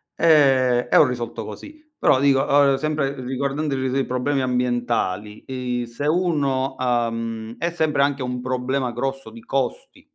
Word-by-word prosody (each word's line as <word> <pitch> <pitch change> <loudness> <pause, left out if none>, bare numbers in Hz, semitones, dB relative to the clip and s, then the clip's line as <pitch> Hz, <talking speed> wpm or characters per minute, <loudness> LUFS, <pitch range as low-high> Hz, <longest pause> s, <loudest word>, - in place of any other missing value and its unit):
E 135 -6 +4
e - - +2
ho - - +8
risolto 120 -2 -4
così. 305 0 -10 0.2
Però 130 - +3
dico, 135 -1 +4
uhm, 140 -1 +4
sempre 150 -1 -1
riguardando 140 +3 -2
i - - -2
ri 130 0 -1
ri 135 - 0
i 135 - 0
problemi 130 +2 -1
ambientali, 120 -5 -1 0.4
i 120 - -5
se 115 +5 -6
uno, 145 -6 0
uhm 115 -2 -2
è 170 - -1
sempre 160 -4 0
anche 140 -1 0
un 125 0 -3
problema 130 0 -1
grosso 135 0 -4
di 115 +1 -12
costi. 135 - -3
130 Hz, 165 wpm, -22 LUFS, 120-140 Hz, 0.4 s, ho